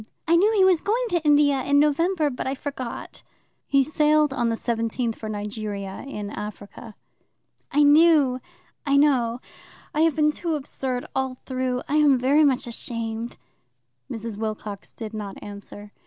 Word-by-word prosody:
"I 335 - +4
knew 400 +6 +4
he 390 -3 +5
was 365 -4 +4
going 460 +4 0
to 345 -4 0
India 290 -2 +4
in 285 +2 +2
November, 300 +1 +2
but 250 - -4
I 265 - -1
forgot." 265 -3 -6 0.5
"He 275 -1 +4
sailed 300 0 +2
on 240 -3 0
the 230 - 0
17th 230 0 -2
for 215 - -7
Nigeria, 205 -2 -5
in 210 -6 -6
Africa." 210 +1 -8 0.8
"I 295 +1 +4
knew 290 -3 +5 0.4
I 280 -1 +2
know. 250 -5 +2 0.5
I 305 - +1
have 325 -2 +3
been 300 -1 +3
too 330 +1 -2
absurd 265 -3 -4
all 265 -1 -1
through. 255 -1 -2
I 295 - +1
am 290 -3 +5
very 275 +5 +3
much 270 -4 +2
ashamed." 230 -1 -5 0.7
Mrs. 225 -2 -5
Wilcox 215 -2 -5
did 220 -2 -8
not 205 -2 -6
answer. 205 0 -9
260 Hz, 155 wpm, -24 LUFS, 225-300 Hz, 0.8 s, he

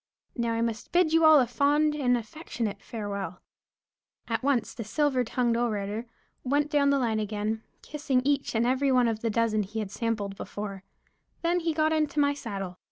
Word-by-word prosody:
Now 235 -2 0
I 230 - -1
must 230 -2 -3
bid 350 -3 +3
you 325 0 +4
all 315 -1 +8
a 255 - +4
fond 290 +6 +2
and 250 -5 +2
affectionate 225 - -5
farewell." 200 -5 -5 0.9
At 225 -1 -1
once 260 -5 +1
the 230 - -6
silver 265 +3 +1
tongued 240 0 0
orator 220 -1 -2 0.4
went 290 +3 +1
down 285 -2 +3
the 280 - +3
line 230 -4 0
again, 215 +1 -2 0.2
kissing 280 -4 -1
each 280 -3 0
and 225 +1 +2
every 265 +2 +2
one 250 -2 +4
of 225 -2 -1
the 230 - 0
dozen 220 -1 +1
he 210 +3 -6
had 210 -3 -3
sampled 210 -3 -2
before; 195 -1 -6 0.6
then 345 +1 +2
he 335 -1 0
got 310 0 +1
into 305 -1 0
my 285 0 +3
saddle. 195 -9 -6
235 Hz, 185 wpm, -27 LUFS, 215-285 Hz, 0.9 s, all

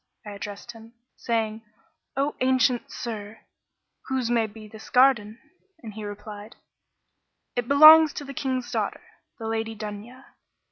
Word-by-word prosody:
I 210 - -7
addressed 205 +3 -8
him, 225 0 -15 0.2
saying, 225 -2 -2 0.6
'O 280 +2 0
ancient 255 -1 +2
sir, 215 -2 -7 0.7
whose 260 -3 -1
may 230 -2 +2
be 215 0 -12
this 220 +1 -13
garden?' 240 -5 +3 0.5
and 220 -2 -8
he 215 +1 -8
replied, 205 +1 -9 1.0
'It 245 -1 -2
belongs 310 +2 +9
to 290 - -6
the 275 - -8
King's 260 -2 -3
daughter, - - -3 0.3
the 225 - -8
Lady 225 0 -3
Dunya. 215 +5 -8
225 Hz, 135 wpm, -25 LUFS, 215-255 Hz, 1.0 s, belongs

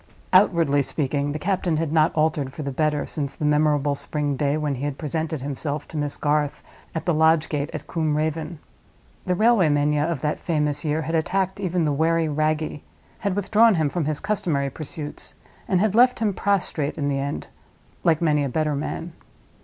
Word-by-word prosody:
Outwardly 165 -7 +4
speaking, 140 0 -1
the 150 - -3
captain 180 -1 0
had 160 -1 -1
not 155 -1 +4
altered 155 -3 +1
for 155 - -6
the 140 - -3
better 150 +1 0
since 145 -3 -4
the 150 - -3
memorable 150 -1 +2
spring 145 0 -2
day 145 +2 0
when 150 -2 -1
he 135 +1 -5
had 145 -1 -2
presented 160 -1 -3
himself 145 +1 -3
to - - -10
Miss 145 -1 -1
Garth 150 -1 0 0.3
at 160 - -3
the 175 - +2
lodge 160 0 +3
gate 150 0 -2
at 155 - -6
Combe 155 -3 -1
Raven. 155 +1 -2 0.7
The 180 - +2
railway 215 -4 +4
mania 145 0 +2
of 160 -4 -2
that 150 - -1
famous 150 -3 -1
year 155 0 0
had 160 +2 -4
attacked 190 +4 0
even 180 -3 0
the 150 - +1
wary 165 +2 +2
Wragge; 155 0 -1 0.4
had 200 -2 -1
withdrawn 215 +2 +4
him 155 -3 +1
from 175 -4 -1
his 150 -1 -1
customary 160 -10 -1
pursuits; 150 +1 -6 0.3
and 185 - +2
had 210 0 +2
left 250 +3 +5
him 215 -3 0
prostrate 180 -7 -1
in 145 -2 -1
the 140 -1 0
end, 140 +1 -4 0.5
like 165 -1 +3
many 150 -3 +3
a 140 - -1
better 155 +3 0
man. 160 +3 -4
155 Hz, 195 wpm, -23 LUFS, 145-165 Hz, 0.7 s, left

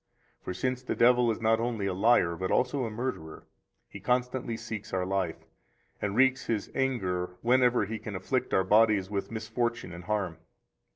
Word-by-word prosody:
For - - -5
since 125 +7 -2
the 130 - -3
devil 125 0 +4
is 110 - -1
not 115 0 +2
only 115 -3 -2
a 95 - 0
liar, 95 -4 +3
but 95 +2 -3
also 130 0 +1
a - - -3
murderer, 110 -9 -5 0.4
he - - -10
constantly 125 -1 -1
seeks 115 -3 -7
our 95 -1 0
life, 95 -3 -2 0.6
and 100 0 -2
wreaks 130 +1 +3
his 110 -3 -2
anger 90 -9 -1
whenever 125 -2 +4
he 110 +2 -5
can 105 - -6
afflict 125 +7 -1
our 95 - +3
bodies 105 -1 +3
with 100 -1 -2
misfortune 115 -2 -3
and 85 0 -9
harm. 95 -4 -1
110 Hz, 175 wpm, -29 LUFS, 95-125 Hz, 0.6 s, devil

